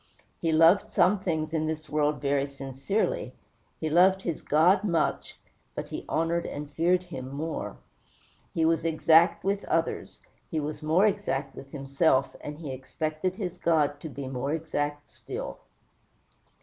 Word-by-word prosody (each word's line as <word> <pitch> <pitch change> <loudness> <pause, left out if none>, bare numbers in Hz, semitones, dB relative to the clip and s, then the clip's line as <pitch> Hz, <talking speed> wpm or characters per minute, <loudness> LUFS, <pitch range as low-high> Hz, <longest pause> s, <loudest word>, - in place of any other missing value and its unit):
He 165 - +1
loved 165 +5 +5
some 205 +2 +4
things 160 -4 -2
in 155 -1 0
this 155 -1 -4
world 150 0 0
very 140 0 +1
sincerely; 140 +9 -2 0.4
he 160 - -2
loved 185 +4 +4
his 170 -3 -3
God 180 +6 +4
much, 170 -6 -1 0.4
but - - -5
he - - -6
honored 165 +1 0
and 145 0 -6
feared 175 +5 +2
him 130 -8 -7
more. 155 +3 -4 0.7
He 160 - +1
was 165 0 +2
exact 165 +1 +4
with 200 +1 0
others; - - -1 0.3
he 160 - -1
was 150 +1 -4
more 160 +6 +3
exact 145 -10 -1
with 135 - -10
himself, 140 0 +1
and 150 0 -6
he 150 -4 -6
expected 155 +7 -3
his 185 -4 -5
God 150 -3 +2
to 160 - -7
be 135 0 -6
more 135 +2 -2
exact 145 -2 -2
still. - - -7
155 Hz, 150 wpm, -28 LUFS, 145-170 Hz, 0.7 s, loved